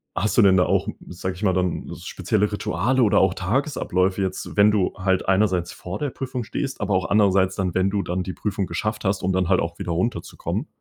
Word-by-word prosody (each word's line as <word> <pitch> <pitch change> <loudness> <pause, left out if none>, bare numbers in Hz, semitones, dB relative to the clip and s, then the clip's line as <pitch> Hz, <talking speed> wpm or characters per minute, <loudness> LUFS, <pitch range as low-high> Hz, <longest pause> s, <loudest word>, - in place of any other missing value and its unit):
hast 110 +6 0
du - - +8
denn 95 -2 +6
da 90 - +5
auch, 95 +1 +1 0.2
sage 90 +1 -4
ich 90 - -9
mal, 95 - +3
dann 90 -1 -1
s - - -9
spezielle 105 +1 0
Rituale 120 +5 +1
oder 105 - +4
auch 95 -1 +3
Tagesabläufe, 95 - 0
jetzt, 95 -1 -3
wenn 105 +1 +6
du 100 -3 +1
halt 95 -1 0
einerseits 95 -3 +2
vor 90 +3 -6
der 145 - -1
Prüfung 130 -2 -4
stehst, 135 +3 -4
aber 100 -1 0
auch 95 - 0
andererseits 95 -2 +3
dann, 95 -3 -1
wenn 95 +1 +2
du 100 0 0
dann 90 +1 -2
die 95 - -5
Prüfung 100 -1 -2
geschafft 105 0 -3
hast, 95 0 +1
um 95 - +1
dann 95 -1 +1
halt 95 - +4
auch 85 0 -4
wieder 85 - -3
runterzukommen. 95 +8 -2
95 Hz, 230 wpm, -23 LUFS, 95-105 Hz, 0.2 s, du